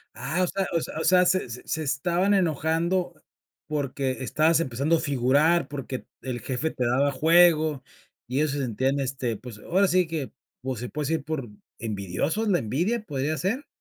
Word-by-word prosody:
Ah, 155 +8 -2
o - - +2
sea 195 +1 -1
o 165 - +3
sea- 155 - -5
o - - -1
sea, 180 0 +5
se 185 -7 +1
se 120 - -9
se 160 0 -2
estaban 175 +8 +1
enojando 170 +1 +1 0.5
porque 140 -3 -1
estabas 155 +4 +3
empezando 140 +2 +1
a - - -3
figurar, 145 +4 +2
porque 135 -2 -6 0.2
el 125 -2 -4
jefe 140 +5 -2
te 125 - -2
daba 135 +4 +2
juego 160 -1 +4 0.4
y 130 +2 -2
ellos 150 -1 +2
se 145 - -2
sentían, 130 +3 0
este, 130 -3 -2
pues, 115 -3 -10
ahora 190 - +2
sí 180 -1 +3
que, 155 -5 -4 0.3
pues, 130 -3 -3
se 125 - -5
puede 150 -2 -3
decir, 160 -3 0
por 140 -7 -3 0.3
envidiosos, 110 - -2
¿la 180 -4 +3
envidia 175 - -1
podría 150 -3 -2
ser? 225 - -2
150 Hz, 185 wpm, -26 LUFS, 130-170 Hz, 0.5 s, sea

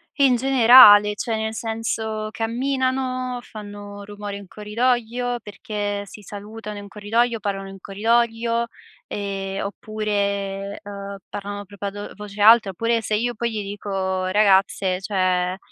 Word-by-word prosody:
è 280 - +2
in 260 -2 +5
generale 240 -5 +8
cioè, 225 +1 -2
nel 220 0 -2
senso: 220 -1 -3
camminano, 255 +2 -1
fanno 205 -3 -9
rumore 205 0 -7
in 200 -1 -9
corridoio, 240 +3 -1
perché 205 -1 -4
si 210 - -12
salutano 210 +1 -8
in 200 0 -9
corridoio, 230 +3 0
parano 195 -2 -3
in 195 - -10
corridoio, 230 +3 +1 0.4
ehm, 195 -1 -4
oppure, 200 -1 -3
uhm, 200 -1 -7
parlano 205 0 -5
proprio 200 +1 -7
a - - -1
do 205 +1 -7
voce 210 0 -8
alta, 220 -1 +7
oppure 230 +5 0
se 215 0 -1
io 240 +3 0
poi 235 +1 -2
gli 215 -1 -3
dico: 195 -2 -3
"ragazze" 190 -1 +3
cioé, 185 -2 0
210 Hz, 135 wpm, -22 LUFS, 200-230 Hz, 0.4 s, generale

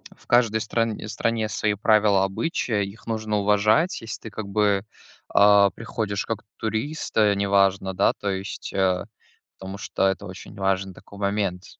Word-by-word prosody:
в - - -24
каждой 115 -2 +3
стран 115 -2 -1
стране 110 +1 -1
свои 105 0 0
правила, 105 -2 +3
обычаи, 105 0 -1
их 100 +4 -12
нужно 110 -2 -1
уважать. 105 - +2
Если 115 - -6
ты 110 - -8
как 105 -1 -6
бы, 100 -1 +1 0.5
а, 100 -1 +6
приходишь 110 -3 -3
как 115 -2 -3 0.2
турист, 110 +8 -3
э, 105 -2 +4
неважно, 100 -1 +2
да, - - +3
то 100 - -4
есть, 95 +1 -5
а, 95 -2 +1 0.5
потому 95 +1 -7
что 95 +1 0
это 95 +1 -2
очень 95 +2 -10
важный 95 -1 -1
такой 100 +3 -14
момент, 100 -3 -1
100 Hz, 160 wpm, -24 LUFS, 95-110 Hz, 0.5 s, а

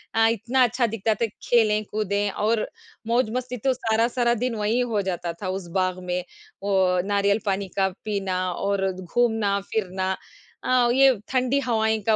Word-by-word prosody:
अ, 225 0 +5
इतना 240 +3 0
अच्छा 245 +1 +2
दिखता 220 0 0
था - - +4 0.2
खेले-कूदें 210 -3 +1
और 220 +1 +2 0.5
मौज 235 0 +2
मस्ती 250 0 -3
तो 265 - +4
सारा-सारा 235 +1 +1
दिन 250 -2 0
वही 215 +3 0
हो 210 -2 +1
जाता 175 -2 -2
था 185 - -2
उस 190 -1 -4
बाग 185 -1 0
में 180 0 -1 0.4
वो 200 -1 +1 0.3
नारियल 200 +1 +2
पानी 195 0 -1
का 190 -1 +3 0.2
पीना 195 -3 -1
और 195 +1 0
घूमना-फिरना 200 -1 -1 0.5
अ, 250 -1 +3
ये 265 -3 +5
ठंडी 255 +1 +1
हवाएँ 220 -2 +2
का 220 - +6
215 Hz, 155 wpm, -24 LUFS, 195-235 Hz, 0.5 s, का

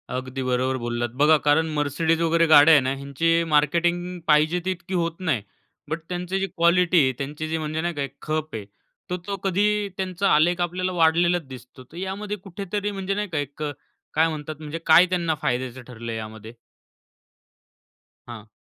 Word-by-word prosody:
अगदी 130 +1 -4
बरोबर 130 +1 0
बोललात. 120 0 -2
बघा, 155 +1 +6
कारण 160 +2 +3
Mercedes 160 +3 0
वगैरे 165 0 +3
गाड्या 155 0 +8
आहे 150 - +6
ना 130 +1 -1
ह्यांची 165 +5 0
मार्केटिंग 175 +4 +1
पाहिजे 155 +3 +3
ती 185 - +1
तितकी 185 +1 -10
होत 170 -1 -1
नाही. 165 - 0 0.5
बट 160 - -2
त्यांची 180 +1 -2
जी 195 - -1
क्वालिटी 170 +1 +3
आहे, 130 - +2
त्यांची 150 +3 -5
जी 160 - -1
म्हणजे 155 0 -3
नाही 175 +1 -2
का 145 -3 -2 0.2
खप 155 -3 -3
आहे, 105 -2 -5 0.4
तो 180 - -1
तो 200 - -2
कधी 205 +2 +1
त्यांचा 190 +1 -1
आलेख 175 +4 +3
आपल्याला 180 +1 -1
वाढलेलाच 170 -1 +2
दिसतो. 130 0 -12
तर 150 +7 -15
यामध्ये 200 +3 -4
कुठेतरी 200 +2 -4
म्हणजे 195 -1 -3
नाही 210 0 -2
का, 160 - -4
एक 145 +1 -4
अ, 150 - -2 0.4
काय 160 +1 +3
म्हणतात, 155 0 -5
म्हणजे 155 +1 -6
काय 160 +2 +7
त्यांना 170 -3 0
फायद्याचं 125 +1 -2
ठरलंय 115 -1 -6
यामध्ये? 110 0 -8 1.7
हां. 115 -3 -9
160 Hz, 175 wpm, -24 LUFS, 140-180 Hz, 1.7 s, गाड्या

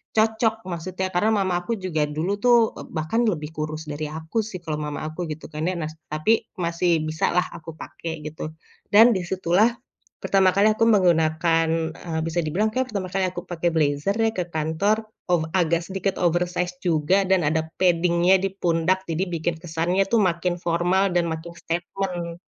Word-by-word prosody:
cocok, 220 +1 +3 0.2
maksudnya. 185 +2 -3
Karena 180 +5 +2
mama 190 -2 0
aku - - -3
juga 160 -4 0
dulu 165 +5 -1
tuh, 245 -1 +6 0.2
eee, - - -8
bahkan 155 +9 0
lebih 150 -2 -6
kurus 155 +1 -3
dari 150 +1 -4
aku, 160 +6 -6
sih. 185 -5 -7
Kalau 155 -3 -3
mama 150 -1 -4
aku, 155 - -13
gitu 155 - -12
kan 155 0 -4
ya. 185 - 0
Nah, 155 - -3 0.2
tapi 215 +9 +2 0.2
masih 170 -1 +1
bisa 155 +1 -1
lah 180 - +2
aku 165 0 -9
pakai, 160 0 -7
gitu. 155 0 -6 0.4
Dan, 215 +2 +9
di 180 - -4
situlah 190 +5 +2 0.5
pertama 190 -1 +3
kali 205 +2 +5
aku 220 +1 +2
menggunakan, 165 -4 +3 0.3
eee, 160 -2 -4
bisa 165 +1 -1
dibilang 180 +8 +1
kayak 255 -1 -1
pertama 195 -3 -3
kali 195 0 +1
aku 175 -1 -5
pakai 175 0 -1
blazer 150 +4 +1
ya, 225 -1 +2
ke 180 -4 -2
kantor. 170 +7 0 0.3
Oh, 165 -2 +2
agak 170 -2 +2
sedikit 195 +1 -2
oversized 175 +1 0
juga. 175 +3 +2
Dan 190 0 +3
ada 160 +1 +1 0.2
padding-nya 175 0 +4
di 195 - 0
pundak. 185 0 0
Jadi 165 +3 0
bikin 170 0 -1
kesannya 175 +3 0
tuh 230 - +4
makin 175 -2 0
formal 175 +3 +2
dan 175 -1 +3
makin 160 +1 -6
statement. 175 0 -4
175 Hz, 180 wpm, -24 LUFS, 160-190 Hz, 0.5 s, Dan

